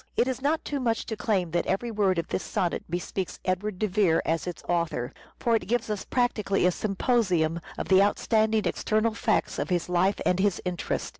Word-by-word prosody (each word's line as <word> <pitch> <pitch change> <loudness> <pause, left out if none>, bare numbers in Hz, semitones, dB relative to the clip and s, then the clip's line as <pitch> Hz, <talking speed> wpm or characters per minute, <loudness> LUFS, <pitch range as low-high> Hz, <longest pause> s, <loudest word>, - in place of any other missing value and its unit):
It 245 - +3
is 260 0 -2
not 305 +3 0
too 285 - -2
much 230 -3 0
to 220 - -4
claim 200 -5 0
that 175 - 0
every 230 +5 -1
word 200 -4 +1
of 170 - -1
this - - -1
sonnet 175 -2 -1
bespeaks 180 +2 -3
Edward 185 +2 -1
de 215 - 0
Vere 185 -4 +3
as 165 +2 -1
its 175 - -6
author; 170 -8 -1 0.3
for 235 -1 +2
it 220 - -1
gives 230 0 0
us 210 - -3
practically 215 -7 +1
a 180 - +5
symposium 185 -5 +1 0.2
of - - -3
the 190 0 +6
outstanding 220 +1 +2
external 215 +1 +1
facts 225 -1 0
of - - -2
his 180 -1 0
life 180 +3 +2
and 180 - +2
his 200 -2 +2
interests. 180 -2 -2
200 Hz, 205 wpm, -27 LUFS, 180-225 Hz, 0.3 s, the